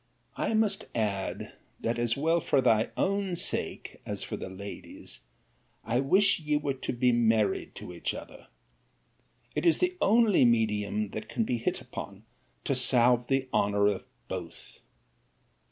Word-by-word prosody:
I 225 - 0
must 220 -2 +1
add, 100 -4 -2 0.3
that, 115 +1 -1
as 120 0 +1
well 165 +4 +2
for 145 - +2
thy 115 -4 +3
own 195 -2 0
sake, - - -3
as - - -4
for - - -4
the - - -6
lady's, 100 +2 -8 0.6
I 115 +2 0
wish 190 +9 +4
ye 150 -2 0
were 145 -1 -1
yet 130 - -8
to - - -2
be 125 +1 +3
married 115 -3 +2
to 90 - -8
each 85 - -3
other. - - -10 1.1
It 150 - -1
is 170 -2 +5
the 360 0 0
only 220 - +5
medium 105 -3 +1
that 110 0 -6
can 230 - 0
be 125 - -1
hit - - -1
upon - - -8 0.4
to - - 0
salve 125 -1 +3
the 135 -1 +1
honour 100 0 +2
of 100 -2 0 0.2
both. - - -8
120 Hz, 155 wpm, -29 LUFS, 110-160 Hz, 1.1 s, is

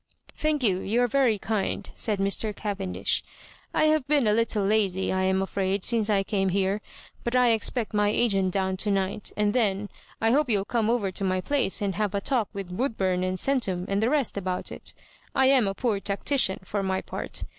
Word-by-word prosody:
"Thank 305 -3 0
you, 190 -5 +2
you 230 +6 +1
are - - +3
very 245 -3 +2
kind," 210 0 -2
said 215 -3 0
Mr. 200 +2 +1
Cavendish. 200 -3 -1 0.5
"I - - +1
have 310 -3 +2
been 290 -3 +3
a 210 - +3
little 220 -2 +1
lazy, 195 -3 +1
I 190 0 +1
am 190 0 +2
afraid, 195 0 -1
since 225 -2 +1
I 200 -2 +2
came 195 -1 0
here; 195 +2 0 0.4
but 235 +1 -2
I 250 -1 +5
expect 225 +1 0
my 205 0 +2
agent 200 -4 +2
down 190 0 -1
to 210 - -1
night, 200 +1 -1
and 210 0 +1
then, 205 -4 0 0.3
I 225 0 +2
hope 285 +1 +2
you'll 200 -3 +1
come 225 0 0
over 225 -5 +1
to 190 - -4
my 185 -1 +1
place 230 -2 0
and 195 -1 0
have 205 -1 -1
a - - +1
talk 230 0 0
with 190 -3 -6
Woodbum 190 -7 0
and 185 0 -1
Centum 195 -9 +1
and 200 +1 0
the 225 - +2
rest 280 -7 0
about 185 -2 -3
it. - - -6 0.4
I 265 - +4
am 260 -6 +4
a 195 - -2
poor 220 -4 0
tactician, 200 +1 +1
for 200 +2 -3
my 190 -1 -1
part. - - -5
205 Hz, 210 wpm, -26 LUFS, 190-230 Hz, 0.5 s, I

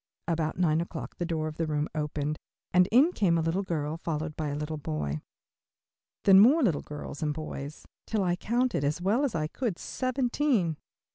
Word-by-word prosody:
About 165 -2 -1
nine 165 -3 +2
o'clock 170 - -6
the 175 - -2
door 160 -2 -1
of 155 - -7
the 165 - -1
room 150 0 0
opened 150 -1 -2 0.3
and 180 0 +6
in 275 +9 +6
came 180 - +2
a - - +2
little 165 +4 0
girl, 160 -4 -2
followed 160 -2 -3
by 155 - -2
a 145 - -2
little 150 +1 -4
boy. 75 - -3 1.0
Then 195 -1 +8
more 275 +10 +6
little 175 - +2
girls 150 -1 -7
and 150 -2 0
boys, 150 -2 -6 0.2
till 215 -3 0
I 175 -1 +1
counted, 240 - 0
as 150 +4 0
well 205 +10 +2
as 275 -9 0
I 155 -1 0
could, 205 +3 -3
seventeen. 255 - 0
165 Hz, 190 wpm, -28 LUFS, 150-200 Hz, 1.0 s, Then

